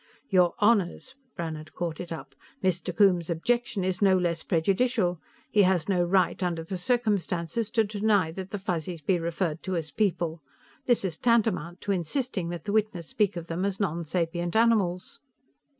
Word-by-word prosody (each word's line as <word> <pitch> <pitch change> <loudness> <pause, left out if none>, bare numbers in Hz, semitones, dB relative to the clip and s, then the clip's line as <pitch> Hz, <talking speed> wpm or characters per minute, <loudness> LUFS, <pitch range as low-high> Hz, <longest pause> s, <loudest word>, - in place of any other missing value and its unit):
'" 280 - -39
"Your 180 -2 +4
Honors," 210 +3 +2 0.2
Brannhard 155 -2 -6
caught 170 -3 -3
it 175 - -6
up, 160 -4 -7 0.3
"Mr. 185 -1 0
Coombes's 180 -5 +4
objection 230 +4 0
is 185 +1 -1
no 190 -2 +5
less 170 -2 0
prejudicial. 190 +1 +1 0.3
He 210 - +5
has 185 -4 +2
no 185 -3 +2
right, 185 +2 +2
under 170 -3 -1
the 180 +3 -4
circumstances, 205 -3 0
to 225 0 +2
deny 205 -4 +1
that 190 +2 -7
the 205 - -3
Fuzzies 175 -4 -3
be 180 +2 +2
referred 165 -1 -2
to 185 - -3
as 160 -3 -3
'people.' 170 -3 -1 0.5
This 240 -5 +3
is 170 -4 -3
tantamount 205 -8 +1
to 205 - -2
insisting 195 - -1
that 175 -1 -5
the 205 - -3
witness 210 -6 0
speak 205 -4 +1
of 170 - -5
them 170 +2 -3
as 195 -1 -1
nonsapient 170 -1 -1
animals." 210 -6 +2
180 Hz, 170 wpm, -27 LUFS, 170-205 Hz, 0.5 s, no